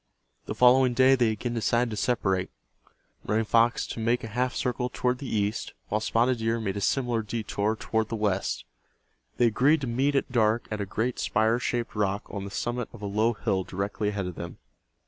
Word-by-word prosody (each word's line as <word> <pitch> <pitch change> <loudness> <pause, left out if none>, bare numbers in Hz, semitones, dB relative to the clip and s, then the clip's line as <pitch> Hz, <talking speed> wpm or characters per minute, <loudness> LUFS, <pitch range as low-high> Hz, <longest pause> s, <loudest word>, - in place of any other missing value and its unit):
The - - -4
following 125 0 +5
day 130 +1 +6
they 120 -4 +3
again 110 +3 -3
decided 115 +1 +1
to - - -3
separate—Running 105 +1 -3
Fox 115 +2 +3
to - - -6
make 115 +2 +1
a 115 - -5
half 125 +3 -1
circle 125 0 -1
toward 125 0 0
the 140 - -6
east, 105 0 -1 0.2
while 105 +1 0
Spotted 120 +2 +1
Deer 115 +1 0
made 100 -3 -2
a 100 - -3
similar 120 -1 +1
detour 110 -1 -2
toward 110 0 -1
the 115 - -2
west. 100 -3 -1 0.7
They 120 - +4
agreed 135 +7 +3
to - - -2
meet 130 +4 0
at 135 - 0
dark 115 -1 +2
at 105 -1 -2
a 100 - -3
great 115 +6 -2
spire 110 +2 +2
shaped 120 -1 -2
rock 100 -1 0
on 100 -2 -5
the - - -6
summit 120 +4 -3
of 105 - -11
a - - -2
low 110 +4 +1
hill 100 -3 -1
directly 100 +3 -2
ahead 100 -2 -3
of 90 - -4
them. - - -7
115 Hz, 200 wpm, -27 LUFS, 105-125 Hz, 0.7 s, day